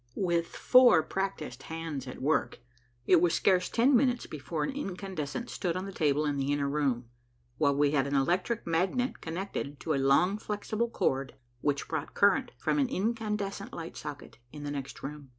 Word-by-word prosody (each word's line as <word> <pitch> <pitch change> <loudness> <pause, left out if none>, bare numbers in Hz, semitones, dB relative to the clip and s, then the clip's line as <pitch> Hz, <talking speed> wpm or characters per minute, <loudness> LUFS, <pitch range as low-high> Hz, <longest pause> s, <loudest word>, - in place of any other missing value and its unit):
With 170 -3 +1
four 250 -10 +6
practised 155 -9 -4
hands 160 -5 -5
at 125 - -7
work, 150 +2 +1 0.5
it 175 +2 +5
was 175 -2 +3
scarce 185 -2 +3
ten 255 +4 +4
minutes 245 -1 +2
before 155 +1 -4
an - - -1
incandescent 195 - -5
stood 175 -4 -2
on 185 +1 -3
the 195 - -6
table 150 -4 +1
in 145 -1 0
the 140 +1 0
inner 145 -1 +1
room, 140 -4 0 0.5
while 140 -2 +3
we 145 0 +3
had 140 -2 +2
an 140 - -1
electric 180 - +1
magnet 185 +10 0
connected 160 -4 -4
to 160 - -1
a 135 - +1
long 175 +10 +3
flexible 215 +2 -2
cord 135 - -1 0.2
which 140 +1 -1
brought 155 -2 -4
current 220 +6 +4
from 295 - 0
an 270 -3 +2
incandescent 210 -3 -2
light 165 -1 -7
socket 145 -5 -8
in 150 -1 -8
the 145 - -3
next 135 -2 -6
room. 145 -1 -7
165 Hz, 180 wpm, -30 LUFS, 145-200 Hz, 0.5 s, four